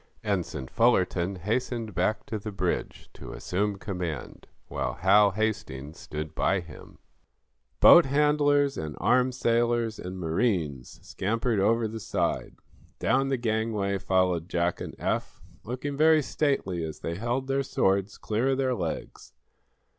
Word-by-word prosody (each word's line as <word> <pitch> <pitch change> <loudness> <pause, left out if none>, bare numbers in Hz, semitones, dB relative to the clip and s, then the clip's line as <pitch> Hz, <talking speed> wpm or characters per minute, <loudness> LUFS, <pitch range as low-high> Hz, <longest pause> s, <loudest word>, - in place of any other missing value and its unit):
Ensign 90 -9 -2
Fullerton 95 - +2
hastened 110 +3 -2
back 95 +5 0
to 110 - -4
the 105 +1 -6
bridge, 95 -3 -3
to - - -9
assume 100 +2 -2
command, 90 -7 -5 0.2
while 65 -4 -3
Hal 100 +8 +5
hastings 90 -9 -3
stood 75 +1 -6
by 95 +4 +1
him. 85 -3 -12 0.8
Boat - - +8
handlers 145 0 +2
and 75 -2 -5
armed 125 0 +2
sailors 115 -2 +1
and 90 +1 -6
marines 80 - -1
scampered 115 +2 -1
over 115 +3 +2
the 110 +1 -6
side. - - -2 0.4
Down 135 - +1
the 135 -1 0
gangway 110 -4 -1
followed 90 -3 +1
Jack 85 0 0
and - - -6
Eph, - - -2 0.2
looking 130 +4 -4
very 155 0 +5
stately 120 - -1
as 80 -1 -6
they 85 - -3
held 120 +8 -2
their 135 +1 0
swords 100 -5 0
clear 110 +4 -1
of 135 -1 +2
their 130 -1 +1
legs. 85 - -5
105 Hz, 140 wpm, -27 LUFS, 90-120 Hz, 0.8 s, Boat